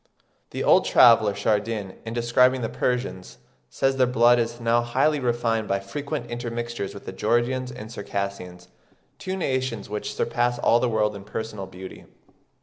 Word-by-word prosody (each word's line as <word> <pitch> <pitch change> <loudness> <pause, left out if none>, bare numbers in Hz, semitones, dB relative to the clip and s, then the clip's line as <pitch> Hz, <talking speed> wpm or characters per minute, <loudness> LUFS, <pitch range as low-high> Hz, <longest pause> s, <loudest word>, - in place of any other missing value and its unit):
The - - -4
old - - +5
traveller 115 -4 +6
Chardin, 105 -1 -1
in 115 - -4
describing 125 +2 +3
the 115 - -2
Persians, 125 -7 -3 0.3
says 135 0 0
their 130 -1 +4
"blood 120 0 +4
is 115 0 -2
now 115 0 +2
highly 135 +6 +1
refined 120 -3 0
by 100 0 0
frequent 140 +6 -5
intermixtures 120 -3 -4
with 100 - -11
the - - -5
Georgians 120 +5 0
and 110 -3 -9
Circassians, 100 -4 -5 0.5
two 190 0 -4
nations 130 - -2
which 105 - -4
surpass 120 +1 0
all 120 0 +3
the 125 - +1
world 105 -2 0
in 100 - -9
personal 105 -1 -6
beauty. 95 0 -11
115 Hz, 155 wpm, -24 LUFS, 105-125 Hz, 0.5 s, traveller